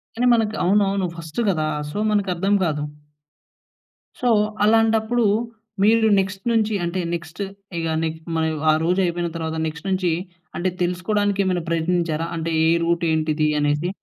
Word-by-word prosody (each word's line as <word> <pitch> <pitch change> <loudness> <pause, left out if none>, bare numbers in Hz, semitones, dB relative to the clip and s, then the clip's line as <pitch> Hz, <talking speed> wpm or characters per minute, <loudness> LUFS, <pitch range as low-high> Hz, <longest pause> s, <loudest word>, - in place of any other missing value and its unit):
కానీ, 245 +2 +1
మనకు 220 -2 +1
అవునవును 195 0 +2
ఫస్టు 165 +5 -5
కదా! 155 -4 0 0.2
సో, 205 - -6
మనకి 205 -2 +1
అర్థం 195 +4 0
కాదు. 150 -2 -1 1.4
సో, 245 - +2 0.3
అలాంటప్పుడు 225 +2 +3 0.6
మీరు 220 +1 +4
నెక్స్ట్ 190 0 -3
నుంచి 220 -2 +1
అంటే, 180 +2 -2
నెక్స్ట్ 170 +2 -6 0.4
ఇక 165 - -2 0.2
నీకు 160 0 -3 0.2
మరి 160 0 +1 0.2
ఆ - - +4
రోజు 180 +3 +1
అయిపోయిన 175 0 -1
తర్వాత, 160 -1 -3
నెక్స్ట్ 155 +4 -7
నుంచి 185 -2 +1 0.5
అంటే, 185 +1 0
తెలుసుకోవడానికి 200 +3 0
ఏమైనా 180 -3 -1
ప్రయత్నించారా? 165 -1 0
అంటే, 165 0 -2
ఏ - - +4 0.2
రూట్ 170 0 0
ఏంటిది 155 -1 +1
అనేసి. 145 +4 0
180 Hz, 145 wpm, -22 LUFS, 160-205 Hz, 1.4 s, మీరు